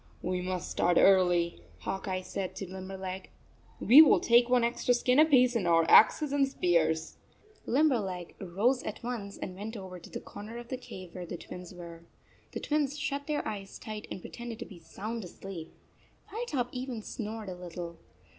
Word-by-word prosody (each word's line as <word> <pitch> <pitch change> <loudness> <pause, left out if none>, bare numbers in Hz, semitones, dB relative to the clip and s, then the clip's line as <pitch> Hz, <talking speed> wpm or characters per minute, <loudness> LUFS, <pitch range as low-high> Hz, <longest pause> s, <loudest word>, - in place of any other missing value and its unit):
"We 180 0 -1
must 180 0 -3
start 175 0 +2
early," 180 -3 +4 0.2
Hawk 195 +1 -4
Eye 185 -1 -2
said 190 0 -4
to 195 - -5
Limberleg. 190 0 -6 0.3
" - - -30
We 275 +6 +12
will 315 - +6
take 240 +1 +4
one 250 -1 +4
extra 240 +1 +2
skin 250 +3 +3
apiece 255 -6 +5
and 200 -6 +1
our 165 -1 +5
axes 295 - +6
and 280 -1 +3
spears." 165 - +1 0.5
Limberleg 225 - +1
rose 210 +8 +1
at - - -6
once 225 -5 -5
and 185 - -6
went 215 +4 -6
over 185 -2 -8
to 170 - -13
the - - -5
corner 215 +3 -9
of 240 0 -9
the 260 - -2
cave 185 -7 -10
where 180 -1 -7
the 175 - -5
Twins 180 +1 -9
were. 170 -2 -10 0.5
The - - -3
Twins 295 -1 0
shut 285 -1 -3
their 300 -1 -1
eyes 195 -2 -6
tight 215 -2 -7
and 185 - -6
pre - - -10
tended 235 -1 -7
to 235 - -6
be 185 -5 -12
sound 210 +7 -6
asleep. 180 -2 -8 0.6
Firetop 320 - -2
even 250 -3 -5
snored 220 -2 -5
a - - -4
little. 175 -1 -7
200 Hz, 185 wpm, -30 LUFS, 180-245 Hz, 0.6 s, We